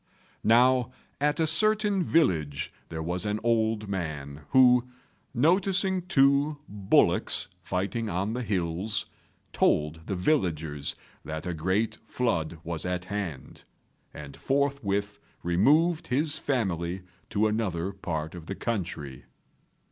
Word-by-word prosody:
Now 125 +2 +4 0.3
at 150 +3 +1
a 160 - +3
certain 210 +2 +3
village 85 - +1 0.2
there 80 -1 -4
was 90 +2 -1
an 105 0 -1
old 110 -2 +1
man, 75 -7 -4
who, 125 -1 +5 0.4
noticing 185 - +2
two 140 -1 +3
bullocks 100 -2 +2
fighting 100 +5 -2
on 95 +4 -1
the 125 - -2
hills, 95 -1 -1 0.5
told 75 +2 +1
the 100 - -2
villagers 80 - 0 0.3
that 80 0 -5
a 90 - -2
great 95 +7 -1
flood 85 -10 -1
was 85 -1 -3
at 90 0 -2
hand, 95 -8 -5 0.5
and 75 -2 -9
forthwith 110 -8 -1 0.2
removed 150 - +3
with 125 +1 +2
his 155 0 0
family 95 - -1 0.3
to 105 +1 +1
another 100 -5 -1
part 80 -5 -4
of 85 -2 -10
the 100 - -4
country. 85 - -4
105 Hz, 120 wpm, -27 LUFS, 85-130 Hz, 0.5 s, who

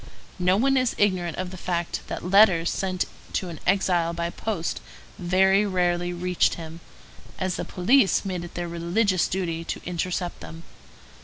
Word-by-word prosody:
No 180 +1 +3
one 270 +4 +3
is 255 -2 +1
ignorant 185 -5 +1
of 185 -1 -4
the 185 - -8
fact 175 -1 -2
that - - -5
letters 185 -3 +5
sent 185 -1 -1 0.3
to 185 - -2
an 165 -3 -8
exile 180 -3 +2
by 170 0 -3
post 200 -6 -3 0.4
very 190 +3 +3
rarely 175 -3 0
reached 180 0 +1
him, 165 0 -8 0.6
as 185 -1 -1
the - - -4
police 205 +3 +3
made 180 -3 -3
it 175 - -10
their 175 0 -3
religious 175 +3 +1
duty 170 -3 -2
to - - -4
intercept 180 0 -3
them. 165 0 -10
180 Hz, 160 wpm, -25 LUFS, 170-190 Hz, 0.6 s, letters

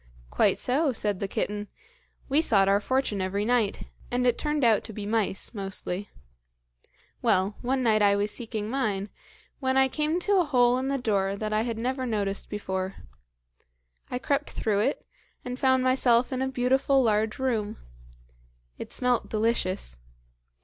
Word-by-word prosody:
"Quite - - +3
so," 280 +4 +1
said 210 -5 -1
the 200 - -2
kitten; 205 +1 -3 0.6
"we 285 +3 +3
sought 200 -10 +4
our 200 +1 +4
fortune 240 -3 -1
every 200 +2 -1
night, 235 -4 +1 0.3
and 250 0 0
it 245 -2 +3
turned 295 -1 -1
out 225 -3 +4
to 220 - -8
be 205 0 -6
mice, 210 -1 -1
mostly. 195 -1 -4 1.1
Well, 190 +3 +1
one 260 +1 0
night 215 -2 +3
I 200 -1 +5
was 205 +1 0
seeking 220 -3 -4
mine, 215 -5 -1 0.5
when 260 -1 0
I 265 0 +5
came 305 +5 -1
to 405 +2 +2
a - - +4
hole 250 -4 +3
in 260 - -2
the 275 0 0
door 200 -5 0
that 215 +1 -3
I 215 - +2
had 230 -1 -3
never 255 +2 -2
noticed 200 -3 -2
before. 190 -2 -3 1.1
I 250 - -2
crept 280 +3 -1
through 210 -2 0
it, 260 +7 0 0.4
and 250 +1 -5
found 260 -1 +3
myself 255 -1 +3
in 260 - -2
a 265 - +1
beautiful 265 +1 +2
large 220 0 +1
room. 230 -6 -1 1.0
It - - -7
smelt 250 -1 0
delicious. 210 - -1
230 Hz, 165 wpm, -27 LUFS, 205-260 Hz, 1.1 s, I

